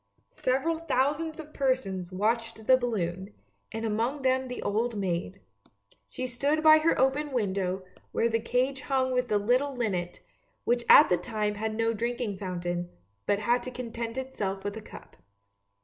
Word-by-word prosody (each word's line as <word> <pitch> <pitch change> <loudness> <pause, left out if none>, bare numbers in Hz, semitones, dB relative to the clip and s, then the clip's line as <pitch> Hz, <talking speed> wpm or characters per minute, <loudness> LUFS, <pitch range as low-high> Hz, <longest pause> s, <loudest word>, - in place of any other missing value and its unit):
" - - -42
Several 290 +6 0
thousands 315 +1 0
of 305 -1 -9
persons 200 -10 -1
watched 225 +3 -1
the 260 - +7
balloon, 200 -6 -2 0.4
and 225 +1 -4
among 230 +6 -1
them 260 0 +2
the 250 - -5
old 225 +2 0
maid. 185 0 -2 0.7
She 255 - -4
stood 280 +5 0
by 310 0 +8
her 320 +2 +2
open 280 +3 +1
window, 190 -5 -1 0.3
where 230 - +2
the 230 0 +1
cage 255 +4 0
hung 260 -1 0
with 250 -1 +1
the 210 - +2
little 250 +7 +1
linnet, 185 -8 -2 0.4
which 240 0 +1
at 300 - +9
that 180 -1 +2
time 210 +2 -1
had 215 +1 -3
no 225 0 +1
drinking 235 -3 -2
fountain, 175 -2 -3 0.4
but 200 - +3
had 235 +4 +1
to - - -6
content 235 -1 -5
itself 205 -8 -3
with 205 +1 -3
a 220 - -6
cup. - - -13
230 Hz, 165 wpm, -28 LUFS, 205-260 Hz, 0.7 s, at